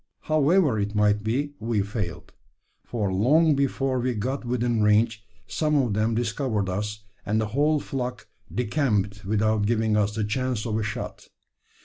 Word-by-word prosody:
However 155 - +3
it 105 +1 -2
might 105 0 +3
be, 140 +7 -1
we 110 -2 0
failed; 100 -5 -5 0.5
for 105 -5 -2
long 150 - +4
before 135 -1 0
we 125 0 -1
got 130 +7 -2
within 120 -2 0
range, 105 +1 +3 0.2
some 150 -1 0
of 125 -7 +2
them 110 +2 +1
discovered 115 -3 -1
us, 105 +3 -3 0.2
and 105 +1 0
the 110 -1 -1
whole 145 +6 +2
flock 125 -3 -4 0.2
decamped 105 - 0
without 110 0 +1
giving 110 -1 +1
us 105 0 +1
the 110 - -1
chance 125 +1 -1
of 110 -1 -1
a - - -1
shot. 105 -2 -5
110 Hz, 155 wpm, -25 LUFS, 105-130 Hz, 0.5 s, long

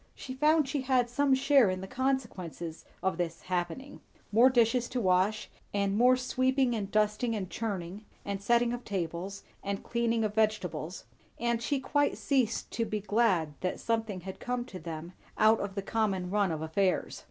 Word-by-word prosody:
She 260 - -7
found 300 +2 +3
she 280 0 -1
had 255 -2 +1
some 280 +1 +3
share 270 -4 +5
in 185 0 -2
the 190 - -6
consequences 220 - -3 0.2
of 190 -2 0
this 170 -1 -3
"happening"; 180 +9 -3 0.3
more 235 +5 +6
dishes 240 -1 +2
to 250 - -2
wash, 195 +1 +2 0.3
and 200 0 +1
more 250 +3 +5
sweeping 255 0 +1
and 205 -4 -3
dusting, 215 +2 +1
and 190 -4 -4
churning, 200 -1 -4 0.2
and 200 -1 -3
setting 235 +3 +3
of 245 0 -5
tables, 185 +1 -4 0.2
and 200 0 -3
cleaning 235 -1 0
of 210 -1 -1
vegetables; 210 -6 -1 0.3
and 235 -1 0
she 275 +4 0
quite 290 +2 +1
ceased 255 -5 0
to 230 - -1
be 215 -1 -2
glad 205 -7 +1
that 185 - -2
something 225 -5 -1
had 190 +1 -8
come 245 0 -2
to 185 -7 -9
them 165 +1 -7 0.2
out 220 +1 +5
of 200 -1 -4
the 200 - -3
common 195 -5 -1
run 200 -3 +2
of 160 -1 -3
affairs. 185 +4 0
215 Hz, 175 wpm, -30 LUFS, 190-245 Hz, 0.3 s, more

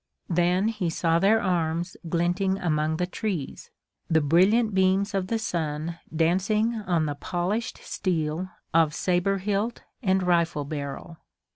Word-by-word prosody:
Then 180 +4 +2
he 210 -6 -2
saw 165 0 +1
their 210 +5 +4
arms 170 -2 -1
glinting 175 +3 +1
among 155 -3 0
the 180 - 0
trees, 180 -5 -4 0.4
the 160 - +4
brilliant 190 +9 +3
beams 190 +2 +2
of 190 -2 -1
the 230 - 0
sun 165 -5 -3
dancing 190 +8 +1
on 180 -8 0
the 145 - -1
polished 185 +9 -2
steel 165 0 -2 0.2
of 160 -2 +3
saber 185 +2 +1
hilt 205 +4 -2 0.2
and 190 -4 +2
rifle 170 -4 +1
barrel. 145 +3 -6
180 Hz, 135 wpm, -26 LUFS, 165-195 Hz, 0.4 s, their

